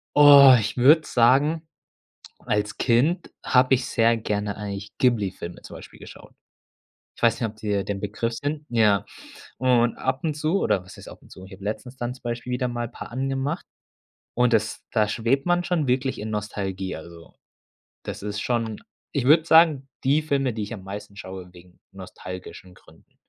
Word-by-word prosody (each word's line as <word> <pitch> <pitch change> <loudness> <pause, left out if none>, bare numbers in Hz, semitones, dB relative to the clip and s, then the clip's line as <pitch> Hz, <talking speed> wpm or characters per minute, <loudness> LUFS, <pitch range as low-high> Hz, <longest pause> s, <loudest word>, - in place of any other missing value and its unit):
Oh, 140 -3 +9
ich 105 -1 -3
würde 145 +6 +6
sagen, 140 +7 +2 0.7
als 105 0 -2
Kind 140 +9 +1
habe 130 +1 +4
ich 125 0 -1
sehr 115 0 +2
gerne 105 -2 -3
eigentlich 100 -1 -7
Ghibli-Filme 100 -8 -1
zum - - -11
Beispiel - - -13
geschaut. - - -14 0.8
Ich - - -18
weiß 115 -1 +3
nicht, 115 - 0
ob 105 - -20
dir 105 -2 -2
die - - -2
'n 100 - -6
Begriff 105 +3 -3
sind? 145 +5 -4
Ja, 105 -4 +3 0.5
und 120 -2 +2
ab 130 0 -1
und 155 -2 0
zu 155 +6 0
oder 95 - +1
was 90 - -13
heißt - - -12
ab - - -12
und - - -21
zu 95 - -12
ich 95 - -14
hab 95 - -12
letztens 110 +5 -5
dann 120 0 -4
zum 130 - -18
Beispiel 120 +1 -4
wieder 125 0 -1
mal 120 -1 -4
paar - - -10
angemacht 135 +5 -3 0.7
und 125 0 +2
das 110 0 0
da 110 -3 +2
schwebt 115 +6 0
man 175 0 +2
schon 175 -5 0
wirklich 130 +1 0
in 110 +1 -5
Nostalgie, 95 -3 -4
also, 85 0 -13 0.7
das - - -6
ist 105 0 -4
schon 115 -3 -2 0.3
ich 135 -4 -1
würde 155 +4 +6
sagen, 160 -5 +4
die 140 +3 +3
Filme, 140 -4 -1
die 110 - -5
ich 105 +3 -5
am 100 -4 -9
meisten 100 +1 -8
schaue 95 -3 -9
wegen 90 0 -18
nostalgischen 90 -1 -10
Gründen. 80 -3 -22
115 Hz, 185 wpm, -24 LUFS, 105-135 Hz, 0.8 s, Oh